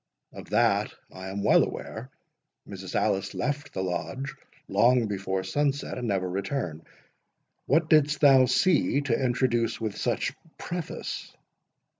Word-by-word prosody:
"Of - - -10
that - - +2 0.2
I 95 0 -7
am 100 +1 -4
well - - +5
aware. 120 +4 -6 0.6
Mrs. - - -7
Alice 95 0 0
left 145 -1 -2
the 95 - -3
Lodge 130 +9 -3 0.3
long 125 -1 +4
before 95 -2 -2
sunset, 140 +8 -1
and 120 - -3
never 95 -3 0
returned. 95 - -3 0.8
What 155 +3 +3
didst 150 -1 +4
thou 135 -3 +7
see 145 +1 +2
to 135 -2 0
introduce 120 -2 +1
with 110 -3 -3
such - - -1 0.2
preface?" 175 -2 -5
125 Hz, 130 wpm, -27 LUFS, 95-140 Hz, 0.8 s, thou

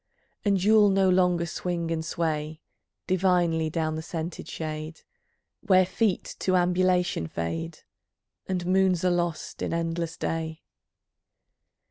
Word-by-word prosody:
And 200 -3 +2
you'll 210 0 +6
no 195 -1 +3
longer 180 -2 +3
swing 170 0 -3
and 160 -1 -1
sway 155 -2 -2 0.5
Divinely 175 -3 +2
down 160 0 -1
the 160 - -3
scented 165 +1 -5
shade, 155 0 -5 0.6
Where 185 -3 +4
feet 190 +1 -1
to 185 - +1
Ambulation 180 - +2
fade, 80 0 -4 0.7
And 180 -2 -2
moons 185 -1 +2
are 180 - +4
lost 175 -2 -2
in - - -1
endless 165 0 -2
Day. 160 0 -3
175 Hz, 120 wpm, -26 LUFS, 160-185 Hz, 0.7 s, you'll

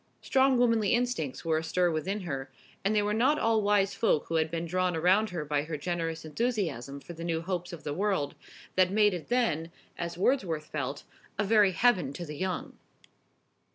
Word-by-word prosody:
Strong 265 -1 +3
womanly 230 -3 +3
instincts 240 - -2
were 160 -1 +2
astir 175 +2 +1
within 190 +6 -2
her, 135 -6 -4 0.3
and 205 +3 +1
they 210 - +3
were 210 0 0
not 260 +7 +3
all 225 -4 +2
wise 200 -1 +2
folk 220 -9 +1
who - - -6
had 160 0 +1
been 165 +1 -3
drawn 180 +1 0
around 185 +6 +3
her 170 -4 -4
by 145 0 0
her 155 +1 -4
generous 165 0 -3
enthusiasm 155 - -2
for 175 - -10
the 165 0 -8
new 165 -1 -1
hopes 180 +1 -3
of 170 -3 -9
the 145 - -3
world, 190 -5 0 0.4
that 185 -1 +4
made 210 0 +4
it 175 -3 -5
then, 170 -10 0 0.3
as 170 0 -4
Wordsworth 180 - +1
felt, 140 -2 -4 0.3
a 205 - +1
very 205 -2 +4
heaven 185 - +2
to 175 - -6
the 150 -1 -7
young. 190 - -4
180 Hz, 190 wpm, -29 LUFS, 160-210 Hz, 0.4 s, that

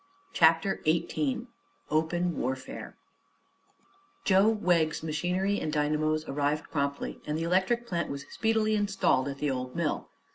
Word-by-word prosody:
CHAPTER 165 +4 +4
XVIII 200 - 0 0.5
OPEN 170 +2 +1
WARFARE 130 +1 -4 1.3
Joe 195 +1 +5
Wegg's 175 -8 +1
machinery 180 +6 0
and 155 - -2
dynamos 155 +1 +1
arrived 145 +2 -1
promptly 140 -1 -2
and 150 +1 -1
the 165 - -2
electric 190 +8 +1
plant 170 -6 -2
was 140 0 -5
speedily 220 -1 +1
installed 195 -10 +2
at 140 -1 -4
the 145 0 0
old 125 -1 -4
mill. 170 -3 -1
160 Hz, 130 wpm, -29 LUFS, 150-190 Hz, 1.3 s, Joe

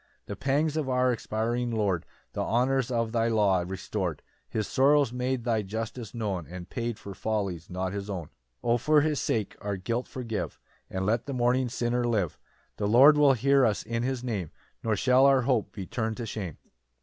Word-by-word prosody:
4 - - -9
The - - -6
pangs 145 +6 0
of 145 -4 -1
our 125 0 +3
expiring 120 +2 -1
Lord 105 -7 0 0.3
The - - -2
honours 130 +2 +1
of 115 -2 0
thy 115 -1 +1
law 105 -5 +3
restor'd; 90 -2 -3 0.3
His 110 -1 -1
sorrows 140 -1 +3
made 125 0 -1
thy 115 -3 +1
justice 110 +2 -5
known, 100 -8 -2
And 90 +2 -8
paid 120 -3 -3
for 100 - -8
follies 100 -5 -2
not 90 +1 -3
his 100 0 -5
own. 90 -5 -3
6 - - -39 0.3
O 120 0 +3
for 150 +4 +4
his 150 -1 0
sake 110 -4 -1
our 100 -1 -2
guilt 115 +7 -2
forgive, 115 -4 -4 0.3
And 95 0 -2
let 115 +5 0
the 140 - -3
mourning 125 0 +2
sinner 120 0 0
live; 105 -9 0 0.4
The 100 - 0
Lord 135 +8 +8
will 145 -2 +6
hear 135 +2 +3
us 110 -4 +1
in 115 +1 -2
his 130 0 -2
Name, 105 -10 -2 0.3
Nor 110 -1 +1
shall 130 +4 +5
our 135 -2 +4
hope 120 -4 +1
be 100 -4 -6
turn'd 110 +2 -2
to 120 - -4
shame. 100 -7 -5
115 Hz, 195 wpm, -28 LUFS, 100-125 Hz, 0.4 s, Lord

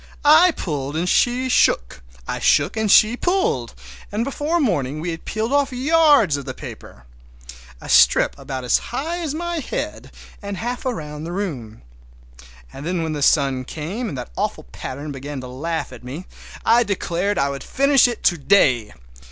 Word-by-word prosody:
I 315 +5 +7
pulled 145 - -4
and 175 +2 -1
she 245 +7 +2
shook, 60 - +2 0.3
I - - -3
shook - - +2
and 220 -1 0
she 215 +3 +6
pulled, 350 - -1 0.4
and 210 +3 -1
before 295 +6 -1
morning 155 - 0
we 170 +2 -3
had 165 - -8
peeled 220 +4 -2
off 285 -1 +2
yards 280 - +4
of 140 - -7
that 130 -2 -7
paper. - - -11 0.7
A - - -11
strip - - +5
about 135 -2 -6
as 125 - +3
high 320 +8 -3
as 310 -4 -3
my 345 0 -3
head 285 - -5 0.3
and 200 -1 -5
half 245 +5 -4
around 150 -10 -5
the 170 - -5
room. 140 - -5 0.9
And 135 - -9
then 175 +1 -2
when 160 -1 -2
the 150 - -4
sun 135 -3 +2
came 180 - -5
and 140 - -6
that - - -7
awful - - -2
pattern 145 +3 -6
began 140 +1 -6
to 125 - -8
laugh 155 +3 -4
at 125 - -12
me 140 +9 -7 0.4
I 235 +1 +5
declared 200 -2 -1
I 140 0 +1
would 140 0 -6
finish 275 -1 +4
it 240 -2 -5
to 175 - +2
day! 130 - +3
175 Hz, 175 wpm, -21 LUFS, -, 0.9 s, I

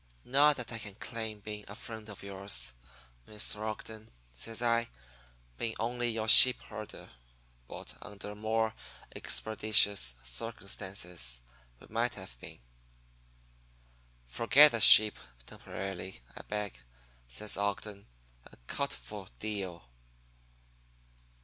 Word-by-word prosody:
Not 145 +3 +4
that 125 -2 -5
I 115 - -3
can 100 -3 -9
claim 110 -2 -6
being 105 0 -7
a 105 - -9
friend 110 -1 -9
of 100 - -11
yours, 95 -11 -3 0.5
Mr. 105 0 -5
Ogden,' 110 0 -7 0.2
says 115 - -7
I, 115 0 +1 0.7
'being 115 -1 -3
only 120 +1 -2
your 110 -1 -3
sheep 125 +2 +10
herder; 110 -1 -9 0.6
but - - -9
under 105 0 -9
more 110 +1 -1 0.4
expeditious 105 - +2
circumstances 90 - -5 0.4
we - - -15
might 115 +2 -1
have 95 -10 -8
been.' - - -12 1.6
"'Forget 115 - +5
the 115 - -2
sheep 105 0 +10 0.3
temporarily, 95 -4 -8
I - - -8
beg,' 105 -1 -4 0.5
says 105 - -4
Ogden, 100 0 -4 0.4
'and - - -17
cut 140 - -2
for 105 -3 -9
deal.' 95 -8 -6
105 Hz, 110 wpm, -31 LUFS, 95-115 Hz, 1.6 s, sheep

